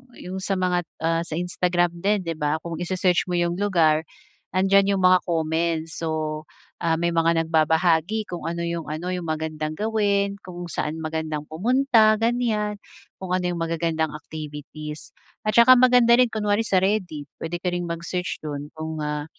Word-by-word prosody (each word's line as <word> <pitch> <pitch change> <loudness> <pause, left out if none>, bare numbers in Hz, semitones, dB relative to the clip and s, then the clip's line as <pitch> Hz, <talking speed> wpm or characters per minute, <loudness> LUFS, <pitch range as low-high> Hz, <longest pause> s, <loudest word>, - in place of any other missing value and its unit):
'yung 185 +1 -6
sa 195 +1 -1
mga, 180 -2 0 0.2
ah, 165 0 +2
sa 155 - -4
Instagram 175 0 0
din 200 +2 +1
'di 165 - -3
ba, 150 +2 -1
kung 170 -1 -5
i-se-search 180 0 +1
mo 180 - -1
yung 175 +1 0
lugar, 165 -6 +2 0.5
'andiyan 195 +1 +4
'yong 190 - -1
mga 185 0 +6
comments. 160 -1 -1
So, 155 -1 -2 0.4
may 170 0 +1
mga 165 0 +2
nagbabahagi 165 +5 +2
kung 175 - -6
ano 170 0 -3
'yong 170 -1 -3
ano 160 +4 -4
'yong 180 -2 -3
magandang 155 -1 -3
gawin, 200 -2 0
kung 175 -1 -7
saan 155 0 -3
magandang 155 -1 -3
pumunta 225 - +3
ganyan, 225 -3 0 0.4
kung 185 -1 -4
ano 185 0 +1
'yong 175 - -3
magagandang 165 -1 -1
activities. 150 0 -8 0.4
At 215 - +1
saka 235 +2 +9
maganda 245 -1 +5
rin 250 0 +4
kunwari 210 0 +1
sa 195 - +2
Reddit, 185 -7 -1 0.2
puwede 165 +2 -3
ka 180 +1 -2
ring 175 0 -2
mag-search 170 +2 -3
doon 145 -1 -5
kung, 160 0 -4
ah, 150 0 -3
170 Hz, 165 wpm, -24 LUFS, 160-195 Hz, 0.5 s, saka